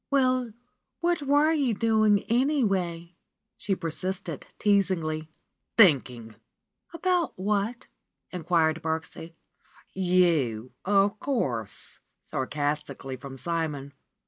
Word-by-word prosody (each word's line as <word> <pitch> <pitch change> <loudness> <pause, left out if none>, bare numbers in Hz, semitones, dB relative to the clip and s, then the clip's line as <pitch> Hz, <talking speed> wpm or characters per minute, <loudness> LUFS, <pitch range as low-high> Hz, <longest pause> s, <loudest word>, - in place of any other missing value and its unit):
^^Well, 255 -4 +2 0.5
what 345 -1 +1
were 290 +2 +3
you 275 -8 +1
doing, 215 -2 +3
anyway?" 195 - 0 0.4
she 195 - -1
persisted, 180 -1 -4
teasingly. 170 -6 +1 0.5
''Thinking 130 - +4 0.3
!" - - -57
abruptly. - - -26
"About 355 -3 +1
what 210 +5 -1 0.2
?" - - -47
inquired 165 -2 +1
Birksie. 160 +1 -4 0.6
"You, 170 - +2
of 200 +1 +3
course 125 - -2
!" - - -53
sarcastically 145 -1 -3
from 135 +1 -9
Simon. 150 -3 -3
185 Hz, 100 wpm, -27 LUFS, 155-225 Hz, 0.6 s, Thinking